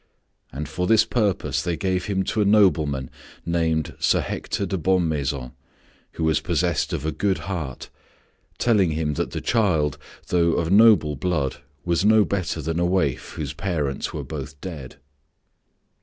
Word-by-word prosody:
And 75 Hz, +3 st, -5 dB
for 90 Hz, +2 st, -2 dB
this 110 Hz, -1 st, +5 dB
purpose 105 Hz, -6 st, 0 dB
they 85 Hz, -2 st, -2 dB
gave 95 Hz, -2 st, -1 dB
him 95 Hz, -2 st, 0 dB
to 110 Hz, -, -1 dB
a -, -, +4 dB
nobleman 80 Hz, -10 st, +3 dB, 0.3 s
named 80 Hz, -2 st, 0 dB
Sir -, -, +3 dB
Hector 100 Hz, -, -3 dB
de 95 Hz, -, -2 dB
Bonmaison, 75 Hz, -8 st, 0 dB, 0.6 s
who 80 Hz, -, -4 dB
was 80 Hz, -1 st, +2 dB
possessed 85 Hz, 0 st, 0 dB
of 70 Hz, -, -3 dB
a 80 Hz, -, 0 dB
good 95 Hz, +5 st, 0 dB
heart, 85 Hz, -8 st, -5 dB, 0.7 s
telling 100 Hz, -9 st, +2 dB
him 75 Hz, -1 st, -1 dB
that -, -, -2 dB
the -, -, -5 dB
child, 85 Hz, -, +1 dB, 0.3 s
though 85 Hz, -2 st, +3 dB
of 85 Hz, 0 st, -1 dB
noble 105 Hz, -8 st, +6 dB
blood, 75 Hz, -3 st, -1 dB, 0.3 s
was 85 Hz, +1 st, +1 dB
no 110 Hz, 0 st, +5 dB
better 90 Hz, -5 st, -2 dB
than 80 Hz, +2 st, -2 dB
a 85 Hz, -, +2 dB
waif 85 Hz, -8 st, 0 dB
whose -, -, -4 dB
parents 75 Hz, -8 st, -2 dB
were -, -, -5 dB
both 75 Hz, -2 st, -7 dB
dead. 75 Hz, -8 st, -8 dB
85 Hz, 155 wpm, -23 LUFS, 75-95 Hz, 0.7 s, noble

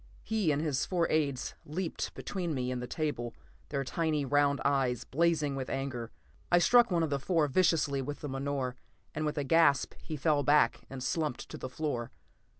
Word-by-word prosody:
He 215 Hz, -8 st, +1 dB
and 145 Hz, -, +1 dB
his 145 Hz, -4 st, 0 dB
four 175 Hz, -3 st, +1 dB
aides 140 Hz, -5 st, 0 dB
leaped 170 Hz, +3 st, -4 dB
between 175 Hz, -5 st, -3 dB
me 125 Hz, -1 st, -1 dB
and 125 Hz, -1 st, -3 dB
the 125 Hz, -, -5 dB
table, 120 Hz, -5 st, -3 dB, 0.3 s
their 140 Hz, -2 st, -1 dB
tiny 155 Hz, +1 st, 0 dB
round 145 Hz, +1 st, +3 dB
eyes 135 Hz, -4 st, +1 dB
blazing 155 Hz, -2 st, +1 dB
with 130 Hz, -1 st, -4 dB
anger. 130 Hz, -4 st, -3 dB, 0.4 s
I 175 Hz, -, +7 dB
struck 240 Hz, +7 st, +6 dB
one 170 Hz, -3 st, +2 dB
of 155 Hz, -, -1 dB
the 140 Hz, -, +1 dB
four 160 Hz, +1 st, +2 dB
viciously 150 Hz, -3 st, +2 dB
with 145 Hz, +2 st, -5 dB
the 150 Hz, -, -4 dB
menore, 135 Hz, -2 st, -2 dB, 0.4 s
and 155 Hz, 0 st, -1 dB
with 150 Hz, +1 st, -3 dB
a 145 Hz, -, 0 dB
gasp 160 Hz, -1 st, +4 dB
he 155 Hz, -, -5 dB
fell 150 Hz, 0 st, +2 dB
back 145 Hz, +2 st, +3 dB
and 130 Hz, -1 st, -6 dB
slumped 150 Hz, 0 st, -2 dB
to -, -, -7 dB
the 130 Hz, -, -5 dB
floor. 130 Hz, -5 st, -3 dB
145 Hz, 190 wpm, -31 LUFS, 135-160 Hz, 0.4 s, I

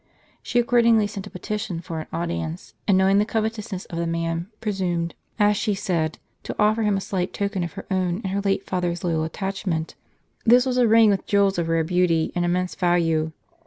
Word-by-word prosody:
She -, -, -2 dB
accordingly 235 Hz, -2 st, +4 dB
sent 205 Hz, -1 st, -6 dB
a -, -, -9 dB
petition 185 Hz, -2 st, -4 dB
for 165 Hz, -1 st, -5 dB
an 155 Hz, -, -7 dB
audience; 170 Hz, 0 st, -4 dB
and 195 Hz, -3 st, +5 dB
knowing 190 Hz, +1 st, +4 dB
the -, -, +4 dB
covetousness 215 Hz, -3 st, -3 dB
of 170 Hz, -, -6 dB
the 170 Hz, -, -1 dB
man, 165 Hz, +1 st, -2 dB
presumed, 180 Hz, -5 st, -1 dB, 0.2 s
as 210 Hz, -1 st, +4 dB
she 210 Hz, 0 st, 0 dB
said, 170 Hz, -5 st, -1 dB, 0.2 s
to -, -, -6 dB
offer 215 Hz, +2 st, +3 dB
him 210 Hz, -2 st, +2 dB
a -, -, -1 dB
slight 185 Hz, -2 st, -2 dB
token 200 Hz, -2 st, -1 dB
of 170 Hz, -, -5 dB
her -, -, -8 dB
own 185 Hz, -2 st, +1 dB
and 190 Hz, -, -2 dB
her 200 Hz, -, 0 dB
late 195 Hz, -1 st, 0 dB
father's 180 Hz, 0 st, -2 dB
loyal 165 Hz, -3 st, 0 dB
attachment. 180 Hz, -1 st, -3 dB, 0.5 s
This 245 Hz, +2 st, +6 dB
was 255 Hz, -1 st, 0 dB
a 245 Hz, -2 st, +5 dB
ring 225 Hz, -1 st, +6 dB
with 195 Hz, -, -1 dB
jewels 200 Hz, -2 st, +3 dB
of 165 Hz, -1 st, -1 dB
rare 165 Hz, 0 st, +2 dB
beauty, 170 Hz, -1 st, +1 dB
and 175 Hz, -, 0 dB
immense 180 Hz, +1 st, 0 dB
value. 165 Hz, -3 st, +1 dB
185 Hz, 200 wpm, -24 LUFS, 170-210 Hz, 0.5 s, This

